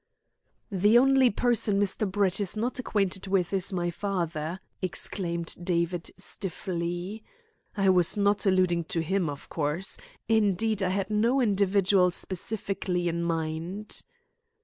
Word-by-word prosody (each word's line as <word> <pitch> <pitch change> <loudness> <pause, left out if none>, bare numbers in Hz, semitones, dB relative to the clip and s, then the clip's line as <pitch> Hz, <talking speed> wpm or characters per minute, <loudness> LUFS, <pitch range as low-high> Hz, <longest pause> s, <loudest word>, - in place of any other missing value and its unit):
"The 205 +4 +4
only 265 0 +5
person 215 -2 +1
Mr. 200 0 0
Brett 195 -1 +1
is 200 +1 -2
not 245 +5 -2
acquainted 195 -5 -1
with 190 -1 +1
is 190 -1 0
my 175 -2 -1
father," 170 -3 -3 0.2
exclaimed 170 -2 -2
David 175 -1 0
stiffly. 185 +1 -3 0.5
"I 195 -1 +3
was 180 +1 +4
not 205 +1 +2
alluding 180 -3 +2
to 165 +1 -2
him, 180 -1 0
of 140 -1 -7
course. 160 +4 -1 0.3
Indeed, 215 -1 +2
I 185 - +1
had 195 +2 -1
no 230 +6 +2
individual 195 -4 +3
specially 185 -1 -3
in 170 0 -2
my 170 -1 0 0.2
mind." 190 +6 -5
190 Hz, 130 wpm, -28 LUFS, 175-205 Hz, 0.5 s, only